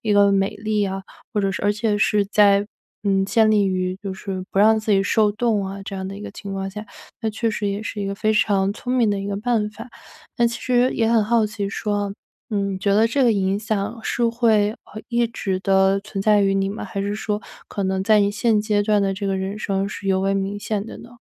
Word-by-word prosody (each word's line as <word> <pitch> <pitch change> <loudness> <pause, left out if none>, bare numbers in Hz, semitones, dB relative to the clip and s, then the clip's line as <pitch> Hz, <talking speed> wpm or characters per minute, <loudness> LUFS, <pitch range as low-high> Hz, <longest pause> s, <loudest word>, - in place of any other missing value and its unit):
一 215 -2 0
个 200 0 +5
美 195 +1 +1
丽 215 0 -1
呀， 195 -1 -2 0.3
或 210 - +1
者 195 0 0
是 - - -4
而 205 - +3
且 210 0 0
是 210 -1 +2
在， 200 0 +4 0.4
嗯， 195 -1 +2
建 220 +1 +3
立 205 -2 +3
于 185 -1 -1
就 195 -1 -4
是 190 -1 -5
不 - - -1
让 220 +2 +5
自 215 - -3
己 195 0 +4
受 210 +1 +3
冻 215 -2 0
啊， 195 +1 -6
这 195 - -6
样 190 0 -4
的 195 - -7
一 205 - -9
个 - - -6
情 200 -1 -8
况 195 0 -3
下， 210 +2 -8 0.3
那 225 - -1
确 225 +1 -1
实 210 -1 -2
也 200 +2 -3
是 210 -1 -5
一 200 - -2
个 195 - -3
非 215 +2 +1
常 200 -2 +2
聪 250 +3 -4
明 230 -4 +3
的 200 - -1
一 195 - -5
个 200 -1 -2
办 215 -1 0
法。 215 - -10 0.5
但 235 -1 +3
其 235 - -5
实 250 0 +2
也 225 - +1
很 230 -2 +4
好 225 +1 +2
奇 205 -1 -4
说， 205 -1 -2 0.4
嗯， 200 -2 -1
你 - - -5
觉 200 +1 +1
得 220 +2 +5
这 270 +4 +1
个 240 - +5
影 195 -1 0
响 215 +1 -3
是 240 - -1
会， 225 -3 +2
呃 215 - -12
一 240 -1 +1
直 195 -5 -3
的 195 0 +3
存 200 -1 -6
在 210 -1 +4
于 195 0 +2
你 195 0 +1
吗？ 205 - -5
还 200 - -4
是 205 +1 -2
说 210 0 -2 0.3
可 200 - -3
能 190 0 0
在 215 0 +5
你 200 0 +2
现 215 0 +2
阶 210 -1 +1
段 210 0 +2
的 195 0 +1
这 200 +1 -4
个 195 -1 0
人 190 +2 -3
生 195 -1 -1
是 200 -1 -7
尤 190 -1 +2
为 195 +1 +1
明 195 +1 -2
显 205 0 -3
的 - - -8
呢？ 240 0 -14
205 Hz, 275 characters per minute, -22 LUFS, 195-215 Hz, 0.5 s, 个